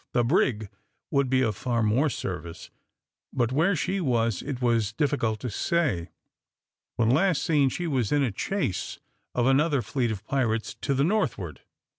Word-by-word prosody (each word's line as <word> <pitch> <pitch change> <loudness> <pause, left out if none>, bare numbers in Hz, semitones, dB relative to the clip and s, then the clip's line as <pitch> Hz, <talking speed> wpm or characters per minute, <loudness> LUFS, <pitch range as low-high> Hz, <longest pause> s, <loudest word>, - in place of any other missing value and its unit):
The 120 - +3
brig 115 - +1 0.4
would 140 -2 +2
be 130 0 +3
of 110 -4 0
far 120 +1 -1
more 120 +8 +2
service; 85 -8 -6 0.6
but 120 -2 0
where 165 +8 +2
she 185 +7 -1
was, 115 - +1
it 140 -4 -4
was 115 -4 +1
difficult 115 -5 0
to 125 - -4
say. 115 - 0 0.9
When 115 -1 +2
last 160 +1 +2
seen, 145 -5 +3
she 175 +7 -4
was 130 -9 0
in 145 -1 +3
a 125 - 0
chase 185 - -2 0.4
of 120 - +2
another 140 0 +3
fleet 125 -4 -1
of 110 -1 -5
pirates 115 -5 0
to 140 - 0
the 135 - +2
northward. 115 - -1
125 Hz, 165 wpm, -26 LUFS, 110-145 Hz, 0.9 s, The